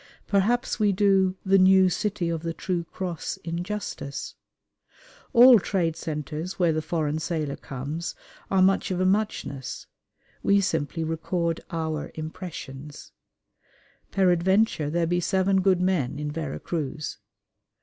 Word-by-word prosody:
Perhaps 220 +6 +1
we 210 -1 +4
do 190 -1 +3
"the 195 0 +5
New 190 0 +6
City 185 0 -1
of 165 -2 -2
the 165 0 -4
True 175 -3 -2
Cross" 175 -1 -4
injustice. 170 -5 -4 1.0
All 245 -1 +9
trade 175 -4 0
centres 155 +3 -5
where 175 -3 +3
the 155 - 0
foreign 155 -1 -1
sailor 155 -4 -2
comes 145 +6 -5 0.3
are 190 -1 +4
much 195 +1 +3
of 185 -1 -1
a 185 - +2
muchness. 185 -9 -1 0.6
We 200 0 +4
simply 165 -3 -1
record 165 +1 -1
our 160 -2 -3
impressions. 155 -3 -8 1.0
"Peradventure 190 -2 +2
there 170 +2 +1
be 175 +2 +1
seven 190 +2 +2
good 185 -1 +3
men 165 -8 0
in 150 0 -3
Vera 155 -2 -4
Cruz." 155 -2 -4
175 Hz, 130 wpm, -26 LUFS, 155-190 Hz, 1.0 s, All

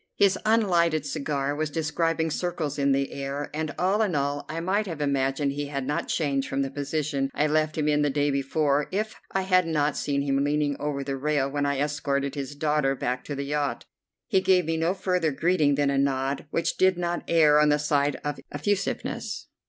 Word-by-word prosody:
His 195 -1 +4
unlighted 175 -8 +3
cigar 140 -1 -2
was 155 0 -1
describing 160 +1 0
circles 160 -4 -2
in 140 0 +3
the 135 0 +1
air, 140 +1 -4
and 155 0 -2
all 195 +4 +2
in 200 -7 +1
all 140 0 -1
I 160 +2 -3
might 200 +5 0
have 165 -4 -5
imagined 140 0 0
he 145 +1 -4
had 140 -2 -3
not 145 +2 -2
changed 140 -4 0
from 135 0 0
the 135 - -4
position 145 -1 -2
I 150 - +2
left 155 0 +1
him 150 -1 0
in 150 0 +3
the 145 - +2
day 145 +1 +1
before 140 +1 +1
if 215 +3 -1 0.2
I 195 - 0
had 185 -2 +3
not 150 -2 +1
seen 140 -1 -1
him 140 0 +1
leaning 145 0 +1
over 145 -1 -2
the 135 0 -3
rail 140 -1 0
when 145 0 0
I 140 -1 0
escorted 140 -1 -1
his 145 0 -5
daughter 150 -2 +1
back 125 0 -2
to 145 - -4
the 140 0 -3
yacht. 145 0 -2 0.4
He 190 - +2
gave 185 -2 +3
me 165 +1 -1
no 165 +3 0
further 180 -5 0
greeting 150 0 +2
than 140 0 +1
a 135 - +1
nod, 135 +1 0
which 165 +1 -1
did 185 -1 +4
not 175 0 -1
err 155 -3 +5
on 150 0 +4
the 150 - +4
side 145 -1 +1
of 145 -1 -3
effusiveness. 195 +7 -2
150 Hz, 205 wpm, -26 LUFS, 140-165 Hz, 0.4 s, err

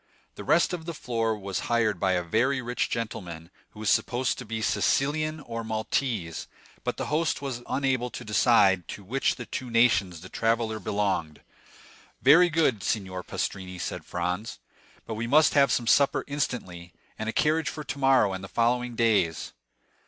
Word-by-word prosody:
The - - -9
rest 160 +6 +3
of 165 -2 -5
the 170 - -4
floor 115 -4 -1
was 100 -2 -4
hired 110 -5 +1
by 95 0 +2
a 90 -1 0
very 120 +10 +1
rich 125 0 -2
gentleman 90 -7 -5 0.2
who 105 - -15
was 110 - +2
supposed 125 +2 0
to 125 - -7
be 115 +1 -4
a 110 - -4
Sicilian 155 +6 +1
or 115 -5 -6
Maltese; 110 - -2 0.4
but - - -2
the - - -3
host 155 +1 0
was 135 -4 -5
unable 130 -3 0
to - - -8
decide 100 -5 +4
to 100 - -8
which 130 +8 0
of - - -15
the - - -6
two 130 - -5
nations 100 -8 +2
the 90 - -9
traveller 115 +1 0
belonged. 95 -7 -2 0.8
"Very 165 +7 +6
good, 155 - +1
signor 95 0 -2
Pastrini," 90 0 -4
said 90 - -5
Franz; 90 +6 -3 0.5
"but 115 - -5
we 110 +2 -3
must 150 +5 +5
have 140 -3 +4
some 120 - +1
supper 140 +4 +3
instantly, 95 - -4 0.3
and 110 - -2
a - - 0
carriage 155 +5 +1
for 150 - -6
tomorrow 135 -8 +2
and 95 0 -6
the - - -6
following 120 +2 0
days." 105 -9 +1
115 Hz, 175 wpm, -27 LUFS, 95-135 Hz, 0.8 s, Very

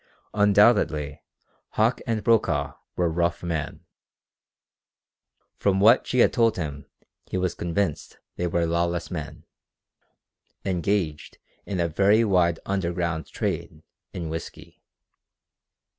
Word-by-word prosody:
Undoubtedly 100 -8 +3 0.5
Hauck - - +2
and 110 -3 -1
Brokaw 115 +1 +2 0.2
were 90 - +1
rough 85 +1 -1
men; 80 -3 -4 1.7
from 95 -1 +2
what 115 +5 +5
she 125 - -1
had 120 - +5
told 115 -1 +2
him 75 -5 -5 0.4
he - - -3
was 90 -1 0
convinced 85 -2 -2 0.2
they 90 - -1
were 85 -1 0
lawless 85 +1 -1
men, 75 -5 -6 1.2
engaged 90 -4 -1 0.3
in 95 -3 -3
a 85 - +2
very 100 +7 +3
wide 90 -5 +2
"underground" 85 -4 -2
trade 80 0 -4 0.3
in 85 -3 -5
whisky. 80 +1 -8
85 Hz, 110 wpm, -25 LUFS, 85-100 Hz, 1.7 s, what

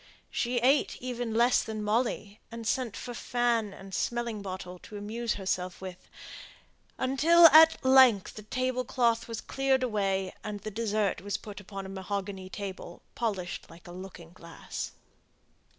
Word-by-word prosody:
She 245 +1 -1
ate 270 +4 +3
even 245 -2 -4
less 240 +2 +4
than 215 -1 -5
Molly, 210 -1 -1
and 230 0 -7
sent 235 -1 -1
for 245 - -6
fan 235 -3 0
and 195 0 -11
smelling 235 -1 -2
bottle 185 -2 -7
to 210 - -10
amuse 220 +3 -3
herself 185 -2 -2
with, 185 -1 -9 0.9
until 310 +7 +5
at 320 -2 +7
length 260 -7 +6
the 215 - -9
table 255 +3 -1
cloth 235 -2 +1
was 230 -2 -5
cleared 270 -1 +1
away, 195 -5 0
and 210 -1 -5
the 215 - -5
dessert 210 -3 0
was 200 +1 -2
put 205 -1 -9
upon 195 -1 -7
a - - -7
mahogany 190 0 -5
table, 190 -3 -7
polished 195 -6 -3
like 165 +1 -15
a - - -9
looking 175 -2 -10
glass. 170 -2 -7
215 Hz, 150 wpm, -29 LUFS, 195-245 Hz, 0.9 s, at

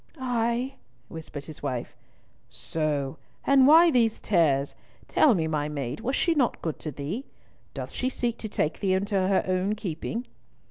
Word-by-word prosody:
"Ay," 245 +1 -1 0.3
whispered 155 -3 -8
his 155 - -10
wife. 125 -4 -4 0.5
"So! 145 -4 -2 0.3
And 270 -1 +6
why 330 +3 +8
these 230 -4 +2
tears? 145 -8 +2 0.3
Tell 270 -8 +4
me, 165 -3 0
my 150 -2 -1
maid, 140 -3 -4
was 260 +4 -1 0.2
not 260 -6 +3
she - - -28
good 160 -3 -3
to 155 - -5
thee? 155 - -5 0.5
Doth - - -5
she 255 - -1
seek 240 -2 -2
to 220 - -5
take 155 -5 -1
thee 190 -2 +1
into 200 +2 -2
her 190 0 +2
own 185 +3 0
keeping?" 215 +4 -4
190 Hz, 160 wpm, -27 LUFS, 155-240 Hz, 0.5 s, why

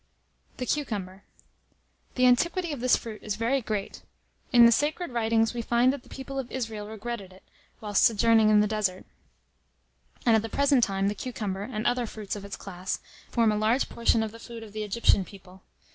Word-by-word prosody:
THE 250 - -3
CUCUMBER. 200 -10 -3 0.9
The 255 - +3
antiquity 340 +7 +2
of 285 - -4
this 250 +1 +4
fruit 220 -2 -7
is 210 -1 -3
very 235 +5 0
great. 210 -3 -4 0.5
In 240 -1 +8
the 235 - +7
sacred 300 +6 0
writings 225 -1 +1
we 240 - -3
find 240 +3 +3
that 280 - -6
the - - -20
people 270 0 -6
of 255 -2 -6
Israel 225 -5 -4
regretted 220 -2 -6
it, 185 - -17 0.4
whilst 205 -2 +1
sojourning 225 -1 +4
in 210 -1 +6
the 210 - +2
desert; 205 -4 -1 1.2
and 230 -2 +5
at 220 - +3
the 225 - -5
present 280 0 +3
time, 195 -1 0
the 205 - 0
cucumber, 210 -4 -4
and 215 0 -4
other 245 -1 +1
fruits 215 -2 -6
of 205 - -7
its 200 -1 -6
class, 185 -1 -5 0.3
form 230 -2 +3
a - - 0
large 220 +5 +1
portion 230 -1 +1
of 220 - -4
the 230 - -12
food 230 -1 -9
of 210 -2 -12
the 215 - -4
Egyptian 210 -1 +2
people. 190 -1 -15
225 Hz, 195 wpm, -27 LUFS, 205-245 Hz, 1.2 s, In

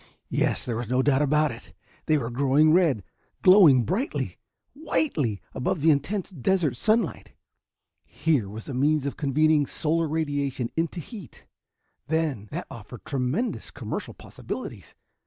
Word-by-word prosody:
Yes, - - 0
there 120 -3 -2
was 120 -1 -4
no 125 +1 +2
doubt 140 0 +3
about 150 +1 +2
it! 115 - -12 0.3
They 155 - +4
were 120 -4 -3
growing 140 +5 +4
red, 160 - +3 0.4
glowing 175 - +7
brightly, 210 - -2 0.3
whitely, 165 - -1
above 135 +4 -1
the 160 +2 +5
intense 180 +8 -1
desert 165 -2 0
sunlight. 220 - 0 0.7
Here 145 -11 0
was 110 +2 -9
a 140 - -5
means 145 +3 +2
of 140 - -3
convening 150 0 +2
solar 165 +1 0
radiation 145 -5 -2
into 165 +2 -1
heat, 180 - -11 0.6
then, 155 -9 -1
that - - -5
offered 115 +2 -10
tremendous 140 - -2
commercial - - -6
possibilities! - - -8
145 Hz, 140 wpm, -26 LUFS, 130-165 Hz, 0.7 s, glowing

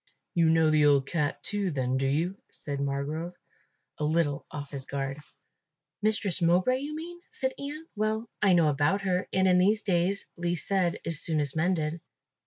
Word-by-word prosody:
"You 165 -2 +4
know 160 -1 +4
the 155 -1 +4
old 140 -2 +4
cat 150 -2 -2
too, 205 -2 -1
then, 130 -4 -1
do 135 0 +1
you?" 165 +7 0
said 140 -2 -6
Margrove, 145 +5 -3 0.6
a - - -2
little 150 -2 0
off 145 -1 -7
his 135 -2 -6
guard. 135 0 -3 0.8
"Mistress 205 -3 +1
Mowbray, 180 +10 +3
you 295 +2 -5
mean," 345 +2 -7
said 260 0 -2
Ian. 295 +3 -6
"Well, 215 +2 -1
I 195 -3 +5
know 165 -3 +5
about 150 +8 +1
her; 185 -1 0
and 190 0 +3
in 180 -1 +5
these 205 +3 +3
days 190 +1 +1
least 175 -2 -2
said 185 -3 +1
is 165 -3 -1
soonest 150 -3 0
mended." 160 -1 0
170 Hz, 175 wpm, -28 LUFS, 145-195 Hz, 0.8 s, I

